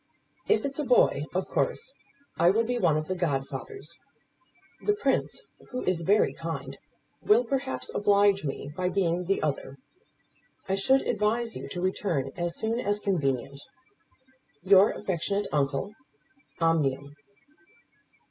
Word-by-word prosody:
If 430 - +2
it's 280 +1 -3
a - - +1
boy, - - +3
of - - 0
course - - -1 0.5
I 170 +1 +6
will 220 +5 +3
be 245 +1 -1
one 165 -6 +3
of 155 0 -3
the 185 - -1
godfathers. 150 - -4 0.8
The 415 - +1
Prince, 435 - 0 0.3
who 255 0 -4
is 180 -2 0
very 200 +6 +3
kind, - - -6 0.4
will 435 +4 +4
perhaps 270 -1 -3
oblige 200 -1 +3
me 140 0 -5
by 180 0 0
being 180 -2 0
the 195 +2 0
other. 140 -2 -3 0.9
I 190 - 0
should 265 +8 +3
advise 225 +3 0
you - - -7
to 175 - -5
return 180 -7 -1
as 175 -1 -2
soon 225 +2 0
as 205 -4 0
convenient. 140 -9 -1 1.0
Your 195 +2 +6
affectionate 200 +1 -2
uncle, 145 +6 0 0.7
OMNIUM. 145 -4 +1
190 Hz, 135 wpm, -27 LUFS, 155-225 Hz, 1.0 s, I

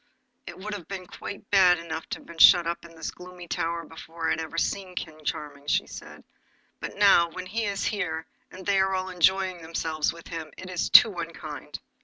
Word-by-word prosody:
'It - - -8
would 210 +3 -6
have 185 -6 -7
been 190 -2 -6
quite 200 +3 -8
bad 185 -3 +6
enough 165 -1 -6
to - - -4
be - - -12
shut 175 -2 +8
up 170 0 -3
in 165 -1 -14
this 160 - -5
gloomy 180 -1 -11
tower 170 0 -2
before 160 +1 -8
I - - +2
had - - 0
ever 160 +1 -7
seen 185 +1 -2
King 155 -3 -6
Charming,' 145 -1 -5
she - - +2
said; - - -11 0.6
'but - - -6
now 195 -4 +5
when 185 +2 -7
he 220 +4 -2
is 200 -1 -2
here, 170 -6 -2 0.2
and 185 0 -11
they 200 -1 +3
are 190 0 +2
all 185 0 -2
enjoying 185 0 +2
themselves 160 -1 -1
with 170 0 -13
him, 160 -3 -6
it 185 0 -8
is 180 - -1
too 215 - +9
unkind. 165 -2 -7
175 Hz, 210 wpm, -26 LUFS, 165-190 Hz, 0.6 s, too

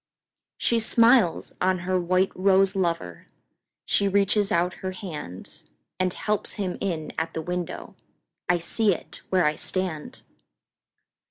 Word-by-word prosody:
She 235 - +1
smiles 230 -4 +4
on 185 0 +2
her 185 0 +1
white 185 +2 +2
rose 195 +1 +3
lover, 165 - -2 0.6
She 200 - +2
reaches 200 +1 +2
out 175 +2 +1
her 185 0 -3
handAnd 165 - -7
helps 210 -1 -2
him 195 -4 -3
in 165 -6 -3
at 165 0 -3
the 160 - -2
window—I 180 0 -5
see 205 +5 +1
it - - -5
where 185 -3 +3
I 150 - +3
stand! 175 -3 -3
185 Hz, 120 wpm, -25 LUFS, 170-195 Hz, 0.6 s, smiles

